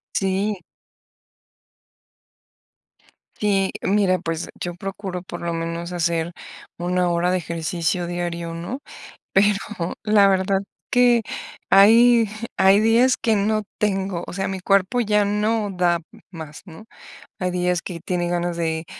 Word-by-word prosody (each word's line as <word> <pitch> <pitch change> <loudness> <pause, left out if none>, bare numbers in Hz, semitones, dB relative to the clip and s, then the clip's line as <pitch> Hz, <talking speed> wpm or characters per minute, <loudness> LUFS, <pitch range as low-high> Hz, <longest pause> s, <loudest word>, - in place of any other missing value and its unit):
Sí. 195 +1 0 2.8
Sí, 195 -2 +1
mira, 195 -2 +2
pues, 165 -1 -4
yo 175 -1 -4
procuro 195 0 -5
por 175 -1 -8
lo 170 0 -2
menos 165 +1 -4
hacer 170 -1 -1 0.4
una 180 +1 0
hora 175 +1 +1
de 185 - +2
ejercicio 170 +1 -2
diario, 170 -1 -4
¿no?, 170 +11 -5 0.5
pero 200 +1 +4 0.5
la 210 -2 +5
verdad 195 0 +2 0.3
que 245 -1 +5 0.5
hay 230 +3 +6 0.3
hay 195 +2 +5
días 235 +4 +4
que 220 -2 +1
no 215 +1 +1
tengo, 195 -4 -1
o - - -7
sea, 190 +1 -2
mi 190 - -4
cuerpo 195 +5 +2
ya 210 -2 +2
no 210 +1 0
da 175 -2 +1 0.3
más, 160 -4 -9
¿no?, 170 +2 -12 0.6
hay 185 -1 -1
días 180 -1 0
que 170 -3 -7
tiene 175 0 -2
ganas 175 0 -1
de 160 -1 -2
185 Hz, 130 wpm, -22 LUFS, 175-205 Hz, 2.8 s, hay